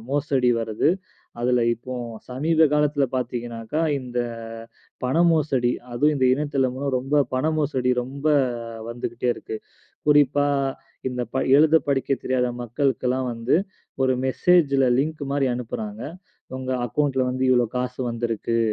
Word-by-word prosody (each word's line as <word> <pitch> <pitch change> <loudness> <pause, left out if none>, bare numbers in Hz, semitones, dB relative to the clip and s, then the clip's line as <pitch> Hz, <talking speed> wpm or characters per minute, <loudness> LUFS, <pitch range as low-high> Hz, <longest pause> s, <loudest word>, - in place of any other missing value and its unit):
மோசடி 140 -3 +1
வருது. 110 +4 0 0.5
அதுல 125 0 +2
இப்போ 125 +3 -8 0.4
சமீப 160 +5 +3
காலத்துல 150 -1 +2
பார்த்தீங்கன்னாக்கா, 120 +2 -3 0.2
இந்த 125 -1 -5 0.9
பணம் 165 +7 +3
மோசடி. 135 -6 +1 0.2
அதுலேயும் 150 +5 +2
இந்த 130 -2 +3
இணையதில்ல 140 -1 -1
ரொம்ப 140 +3 +2
பண 130 +4 0
மோசடி 130 -4 0
ரொம்ப 140 +4 -6 0.6
வந்துகிட்டே 120 +1 -3
இருக்கு. 110 - -6 0.5
குறிப்பா 145 -1 +4 0.6
இந்தப் 125 -2 -4
ப - - -3 0.2
எழுதப் 155 +1 +4
படிக்கத் 135 -1 0
தெரியாத 130 -1 +1 0.2
மக்களுக்கெல்லாம் 130 +1 0
வந்து, 115 +4 +1 0.5
ஒரு 130 0 +3
மெசேஜ்ல 140 -2 +3
லிங்க் 155 +2 -1
மாரி 140 -1 +1
அனுப்புறாங்க. 110 -3 -5 0.6
உங்க 130 0 -4 0.2
அக்கௌன்ட்ல 135 +1 0
வந்து 130 +1 -1
இவ்ளோ 125 -1 +4
காசு 125 +1 -3
வந்திருக்கு. 115 0 -1
130 Hz, 120 wpm, -24 LUFS, 125-145 Hz, 0.9 s, குறிப்பா